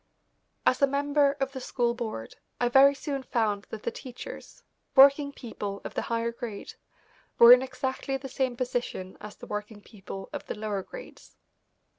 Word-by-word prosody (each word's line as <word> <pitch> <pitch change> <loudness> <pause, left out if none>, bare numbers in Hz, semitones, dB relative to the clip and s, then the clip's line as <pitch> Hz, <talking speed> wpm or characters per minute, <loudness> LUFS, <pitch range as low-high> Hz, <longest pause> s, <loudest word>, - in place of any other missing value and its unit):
As 255 - +3
a 280 - +6
member 285 +1 +2
of 270 -1 -3
the 260 -1 -7
school 240 -1 0
board 220 - -6 0.2
I 245 - +2
very 275 +3 +6
soon 275 0 -4
found 215 -6 -1
that 215 - -7
the - - -1
teachers, 260 - -10 0.3
working 280 +1 +7
people 205 -6 -6
of - - -7
the - - -1
higher 230 0 -1
grade, 235 -3 -7 0.6
were 235 +1 +11
in 250 - +6
exactly 265 +1 -3
the 270 0 -8
same 260 -2 -2
position 245 -7 -3
as 210 0 -9
the - - -11
working 210 +1 -5
people 195 -2 -9
of - - -5
the - - -4
lower 210 -2 -3
grades. - - -12
245 Hz, 170 wpm, -28 LUFS, 215-270 Hz, 0.6 s, were